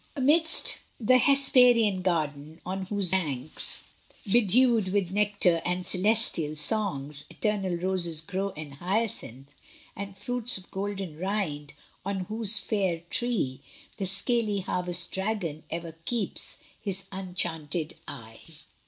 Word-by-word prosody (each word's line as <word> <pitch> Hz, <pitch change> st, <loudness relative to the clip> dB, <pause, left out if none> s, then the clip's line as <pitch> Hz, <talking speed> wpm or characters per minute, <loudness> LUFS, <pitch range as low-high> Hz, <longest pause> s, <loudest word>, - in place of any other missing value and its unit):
Amidst 315 Hz, +4 st, +6 dB, 0.3 s
th' 255 Hz, -, +3 dB
Hesperian 250 Hz, -7 st, +4 dB
garden, 155 Hz, -3 st, -3 dB
on 190 Hz, 0 st, -5 dB
whose 200 Hz, -3 st, +3 dB
banks, 150 Hz, -7 st, -4 dB, 0.5 s
Bedewed 235 Hz, 0 st, +4 dB
with 195 Hz, -3 st, -1 dB
nectar 200 Hz, -4 st, +1 dB
and 180 Hz, +1 st, -2 dB
celestial 185 Hz, -6 st, 0 dB
songs, 150 Hz, -4 st, 0 dB
Eternal 200 Hz, -4 st, -2 dB
roses 175 Hz, -3 st, 0 dB
grow 195 Hz, +3 st, -3 dB
and 150 Hz, -2 st, -8 dB
hyacinth, 175 Hz, -, -3 dB, 0.5 s
And 200 Hz, 0 st, -8 dB
fruits 245 Hz, -2 st, +3 dB
of 190 Hz, -, -9 dB
golden 195 Hz, -5 st, -5 dB
rind, 170 Hz, -7 st, -4 dB, 0.3 s
on 195 Hz, 0 st, -3 dB
whose 215 Hz, +2 st, +5 dB
faire 195 Hz, -5 st, -1 dB
tree, 230 Hz, -, -2 dB, 0.4 s
The 195 Hz, -, -3 dB
scaly 210 Hz, +1 st, -1 dB
harvest 180 Hz, -1 st, 0 dB
dragon 190 Hz, -6 st, -4 dB
ever 165 Hz, 0 st, -6 dB
keeps 235 Hz, -4 st, -2 dB, 0.2 s
His 195 Hz, -2 st, -4 dB
unenchanted 170 Hz, -4 st, -2 dB
eye. 115 Hz, -6 st, -10 dB
190 Hz, 115 wpm, -26 LUFS, 165-210 Hz, 0.5 s, Amidst